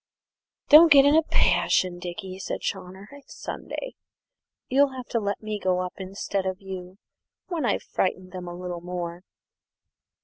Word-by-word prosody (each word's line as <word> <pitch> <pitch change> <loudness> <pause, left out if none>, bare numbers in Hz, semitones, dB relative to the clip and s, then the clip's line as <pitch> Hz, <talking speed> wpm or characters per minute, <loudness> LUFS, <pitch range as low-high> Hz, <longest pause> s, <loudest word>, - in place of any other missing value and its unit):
"Don't 315 +2 +9
get 280 -1 +8
in 285 +1 +5
a 320 - +6
passion, 185 - +2
Dickie," 185 +2 -7
said - - -4
Chawner; 190 +3 -5
"it's 285 0 -13
Sunday. - - -6 0.7
You'll 275 +1 +3
have 255 -1 -7
to 230 - 0
let 200 0 -3
me 215 -1 -3
go 185 -1 +1
up 180 0 -4
instead 195 0 -3
of 185 0 -3
you 185 -1 -8 0.5
when 330 -7 -1
I've 210 - 0
frightened 185 0 -2
them 180 -1 -7
a 175 - -6
little 180 -1 -5
more." 175 -1 -5
190 Hz, 160 wpm, -25 LUFS, 180-255 Hz, 0.7 s, Don't